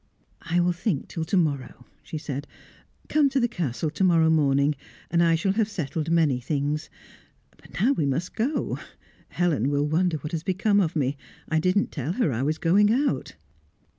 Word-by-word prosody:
"I 170 +1 0
will 175 0 +3
think 175 -3 -2
till 165 -2 -4
to 190 - 0
morrow," 140 -7 -1 0.2
she 155 - -6
said. 145 -2 -5 0.6
"Come 300 -2 +3
to 270 0 +1
the 240 - +2
Castle 155 - -3
to 160 +5 -2
morrow 165 -3 +4
morning, 140 -1 +3 0.4
and 170 0 +3
I 165 -1 +4
shall 175 +4 +1
have 210 +1 0
settled 160 -4 -3
many 160 -6 +3
things. 145 +3 -2 0.7
But - - -11
now 235 +8 +4
we 155 - 0
must 150 +7 -2
go; 265 +7 -1 0.5
Helen 155 -8 +1
will 145 0 +1
wonder 160 +2 +1
what 150 0 -7
has 165 - -2
become 200 +3 +1
of 175 -4 0
me; 140 -2 0 0.3
I 160 -1 +2
didn't 185 +5 +1
tell 145 +3 -3
her 185 - +1
I 115 - -2
was 155 +3 0
going 200 +6 +4
out." 275 +5 0
165 Hz, 185 wpm, -25 LUFS, 145-185 Hz, 0.7 s, morrow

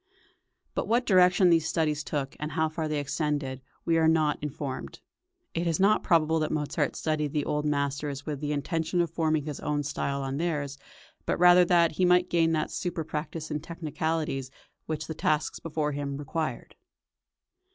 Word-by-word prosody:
But - - -2
what 240 +2 +2
direction 180 -1 +5
these 165 -1 +3
studies 155 -2 0
took, 140 -2 -3
and 150 0 -4
how 160 +1 +1
far 155 0 -3
they 155 -1 -1
extended, 145 -2 -2 0.2
we 165 -1 +3
are 160 - +4
not 155 -2 +2
informed. 145 -2 -5 0.5
It 170 +1 -1
is 165 -2 0
not 205 +3 +4
probable 160 -1 +3
that 155 - -1
Mozart 150 0 -1
studied 150 -2 -1
the 150 -2 0
old 150 0 -1
masters 140 -1 -2
with 150 -3 -3
the 150 0 -2
intention 160 +4 -1
of 170 -2 -1
forming 155 -3 0
his 150 -3 -5
own 145 0 -1
style 140 -1 -2
on 135 0 -3
theirs, 145 -4 -2 0.5
but - - +1
rather 180 0 +7
that 170 -2 +4
he 185 - +3
might 180 0 +4
gain 165 -1 +3
that 155 -1 -1
surer 175 -3 -3
practice 155 +1 -5
in 150 - -1
technicalities 155 -3 -3 0.4
which 155 -1 -3
the 160 - -5
tasks 155 0 0
before 155 -2 -2
him 140 -1 -3
required. 155 +2 -4
155 Hz, 175 wpm, -28 LUFS, 145-165 Hz, 0.5 s, rather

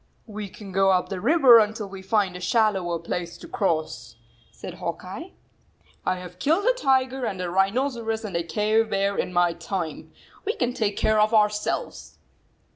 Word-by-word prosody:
"We 210 -2 -7
can 200 0 -11
go 195 +1 +3
up 185 -1 +2
the 190 -2 -4
river 260 -2 +7
until 215 -1 -1
we 195 0 -9
find 195 -1 0
a - - -6
shallower 190 -3 +1
place 170 +1 -5
to - - -11
cross," 155 - -2 0.4
said 180 - -9
Hawk 170 +1 -4
Eye. 280 - -8 0.4
" - - -34
I - - 0
have 180 0 -10
killed 325 - +1
a - - +4
tiger 265 - +1
and 190 -5 -3
a 180 -1 -3
rhinoceros 225 +3 0
and 195 -5 -6
a 170 - +1
cave 215 +6 +1
bear 200 0 0
in - - -2
my 175 -1 +2
time. 170 -1 -5 0.3
We 430 - -1
can 245 0 -1
take 210 -4 -1
care 215 0 +2
of 215 +2 +3
ourselves." 210 - 0
200 Hz, 185 wpm, -24 LUFS, 180-225 Hz, 0.4 s, river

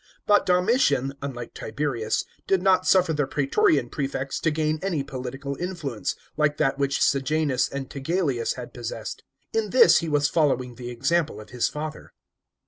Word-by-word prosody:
But 205 0 +4
Domitian, 180 - +2
unlike 125 -4 -6
Tiberius, 120 -2 -2 0.2
did 190 -2 +2
not 185 -1 +3
suffer 180 -3 +4
the 145 -3 0
praetorian 140 -1 +2
prefects 135 0 -3
to 160 - +1
gain 155 0 0
any 175 -7 -1
political 135 +1 -5
influence, 150 - -3 0.2
like 150 -1 +2
that 135 -2 +1
which 140 0 +1
Sejanus 140 -1 +1
and 135 -1 -5
Tigelliuus 140 -4 -1
had - - -8
possessed. - - -6 0.3
In 450 0 0
this 470 -2 +6
he 165 - -3
was 145 -1 +2
following 135 -5 +1
the 120 0 -7
example 145 +6 0
of 105 - -12
his 125 -2 0
father. 150 +1 -7
145 Hz, 155 wpm, -25 LUFS, 135-165 Hz, 0.3 s, this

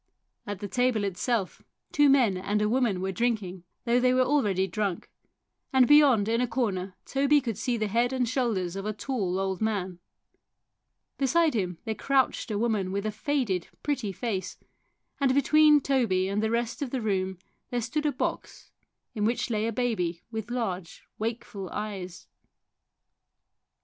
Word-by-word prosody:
At 205 -1 -5
the 205 - -3
table 245 0 +1
itself 200 +1 -1 0.3
two 290 -1 +4
men 250 -8 +4
and 200 +3 -1
a 210 - +2
woman 225 -5 +1
were 190 0 -1
drinking, 190 -4 -2 0.2
though 240 +1 +3
they 255 0 +3
were 255 - +4
already 210 -9 +2
drunk, 195 -1 -3 0.6
and 260 -2 +5
beyond 280 -8 +6
in 230 +2 +1
a 250 - +1
corner 200 -6 -2
Toby 280 +2 +3
could 235 -5 -3
see 240 +3 -1
the 215 - 0
head 235 +4 +1
and 255 -2 0
shoulders 220 -8 -1
of 195 +1 -4
a 215 - -1
tall 205 -6 -2
old 190 0 -2
man. 190 -5 -1 1.2
Beside 315 +4 +3
him 180 -6 -2
there 220 - -1
crouched 265 +1 +1
a 210 - -1
woman 210 -4 0
with 200 +2 -2
a 215 - 0
faded, 220 - -1 0.2
pretty 265 -9 -1
face, 195 -1 -4 0.6
and 270 -2 +2
between 300 +2 +6
Toby 235 -10 +1
and 200 +2 -1
the 220 - 0
rest 235 +3 -1
of 280 - -2
the 260 - -2
room 190 -4 -1 0.3
there 245 - -1
stood 300 +6 -1
a - - +2
box - - -4 0.4
in 210 -3 -2
which 235 +3 0
lay 215 0 0
a - - -1
baby 205 -8 -1
with 220 -1 -5
large, 190 -8 -4 0.2
wakeful 215 -4 -4
eyes. 195 -4 -6
220 Hz, 165 wpm, -27 LUFS, 195-255 Hz, 1.2 s, beyond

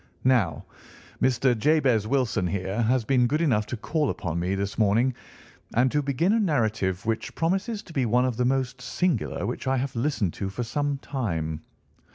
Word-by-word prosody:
Now, 125 -6 +2 0.6
Mr. 130 -1 +3
Jabez 125 -4 +2
Wilson 125 -8 +1
here 95 +4 -2
has 120 +1 +2
been 125 0 +3
good 150 +5 0
enough 115 -11 +1
to 120 - -4
call 150 +5 -1
upon 85 -3 -3
me 90 +3 0
this 100 +2 -3
morning, 115 +5 +3 0.6
and 125 +2 +3
to 150 - +2
begin 145 +8 +1
a 230 - +3
narrative 110 - 0
which 115 0 -2
promises 195 +6 -1
to 170 - -13
be 130 -5 +1
one 125 +3 +3
of 125 -3 -1
the 125 - +1
most 130 -1 0
singular 175 +8 -1
which - - -4
I 135 0 +2
have 130 0 -3
listened 115 - 0
to 95 - -4
for 120 +5 -4
some 145 +3 -1
time. 85 - -3
125 Hz, 185 wpm, -26 LUFS, 105-140 Hz, 0.6 s, Mr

